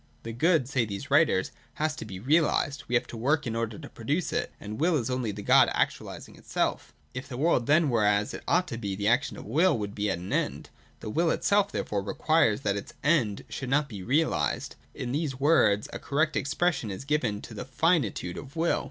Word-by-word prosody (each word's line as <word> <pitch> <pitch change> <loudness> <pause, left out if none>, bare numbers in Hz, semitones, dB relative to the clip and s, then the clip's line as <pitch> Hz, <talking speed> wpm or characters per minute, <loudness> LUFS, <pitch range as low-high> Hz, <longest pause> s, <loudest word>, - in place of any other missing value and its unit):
The 115 - -5
Good, 155 +1 +2
say 130 -3 +1
these 100 -3 -6
writers, - - +3 0.2
has 155 0 -1
to - - -6
be 95 -3 -7
realised: 145 - +1
we 125 - 0
have 120 - +2
to - - -9
work 145 +6 +1
in 115 -2 -3
order 115 -1 -2
to 155 -3 -9
produce 145 +10 -2
it: - - -1
and 105 +2 -7
Will 170 +2 +3
is 125 -2 -2
only 125 -4 -1
the - - -7
Good - - +6
actualising - - -3
itself - - -2 0.2
If 130 +2 -6
the 125 - -6
world 140 -5 +2
then 155 +2 +4
were 115 -5 +2
as 105 0 +2
it - - -6
ought 180 +1 +2
to 115 -4 -5
be, 100 -4 -3
the 100 +1 -2
action 125 +4 +1
of - - -9
Will 165 -1 +3
would 100 -2 -4
be 105 0 -1
at - - 0
an 90 +2 -6
end. - - -2 0.3
The 105 - -5
Will 165 +7 +2
itself 200 +4 +2
therefore 100 -1 -2
requires 110 +2 +2
that 100 -1 0
its 100 - -8
End 130 -9 +2
should 130 - -5
not 145 +2 +2
be 105 -7 -8
realised. 145 - 0 0.2
In 125 -2 -4
these 140 -2 -2
words, 110 -9 +3
a - - -5
correct 155 +3 0
expression 140 -4 0
is 95 +7 -6
given 130 -8 0
to 115 - -9
the 110 - -5
finitude 130 - 0
of 140 +2 -12
Will. 165 +1 +1
130 Hz, 220 wpm, -28 LUFS, 105-155 Hz, 0.3 s, Good